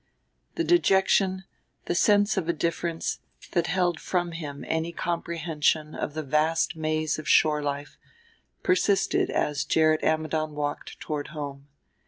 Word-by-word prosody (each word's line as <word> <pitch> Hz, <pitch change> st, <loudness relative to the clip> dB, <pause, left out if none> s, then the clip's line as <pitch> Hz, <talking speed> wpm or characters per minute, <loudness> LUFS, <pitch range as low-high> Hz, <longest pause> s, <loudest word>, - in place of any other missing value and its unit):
VIII -, -, -46 dB
The 335 Hz, -, 0 dB
dejection, 190 Hz, -, +3 dB, 0.4 s
the -, -, -1 dB
sense 205 Hz, +3 st, +3 dB
of 180 Hz, -4 st, -2 dB
a -, -, +3 dB
difference 170 Hz, +1 st, -2 dB, 0.3 s
that 170 Hz, -1 st, +1 dB
held 175 Hz, -2 st, +1 dB
from 175 Hz, -2 st, -1 dB
him 150 Hz, -4 st, -6 dB
any 160 Hz, +1 st, -1 dB
comprehension 165 Hz, -3 st, -1 dB
of 150 Hz, -, -4 dB
the 155 Hz, -, -3 dB
vast 155 Hz, +4 st, +1 dB
maze 155 Hz, -1 st, -1 dB
of 155 Hz, -, -5 dB
shore 150 Hz, -1 st, +4 dB
life, 145 Hz, 0 st, -4 dB, 0.6 s
persisted 185 Hz, +2 st, +2 dB
as 145 Hz, -1 st, 0 dB
Gerrit 155 Hz, +1 st, +3 dB
Ammidon 155 Hz, -1 st, 0 dB
walked 145 Hz, 0 st, -4 dB
toward 150 Hz, -2 st, -4 dB
home. 145 Hz, -2 st, -7 dB
160 Hz, 140 wpm, -26 LUFS, 150-175 Hz, 0.6 s, shore